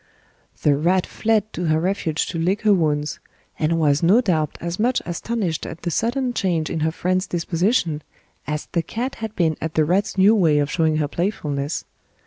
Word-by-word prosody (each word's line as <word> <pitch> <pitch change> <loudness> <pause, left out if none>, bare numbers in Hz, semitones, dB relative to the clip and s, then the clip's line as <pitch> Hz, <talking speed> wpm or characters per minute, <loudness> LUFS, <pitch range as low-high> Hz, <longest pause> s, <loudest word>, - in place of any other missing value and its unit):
The 145 -2 +4
rat 175 +5 +2
fled 215 -1 0
to 175 - -3
her 155 -1 +2
refuge 170 -3 -1
to 170 - -3
lick 185 +6 0
her 210 -1 +5
wounds, 150 -4 0 0.4
and 160 +2 +1
was 145 -2 +3
no 185 +7 +5
doubt 160 - 0
as 170 +2 -4
much 245 +3 +2
astonished 175 -1 -2
at 160 - -9
the 170 - -1
sudden 245 - 0
change 170 -8 0
in 165 - -2
her 160 +1 +1
friend's 185 +3 -1
disposition 170 -1 0 0.5
as 150 +1 -3
the 170 - +1
cat 240 +10 -4
had 220 -1 -4
been 160 -3 +1
at 160 0 -4
the 155 - +3
rat's 195 +5 0
new 195 +3 +6
way 165 -8 +3
of 145 -1 +1
showing 160 -3 +2
her 150 -1 0
playfulness. 150 -5 -2
170 Hz, 190 wpm, -22 LUFS, 155-200 Hz, 0.5 s, new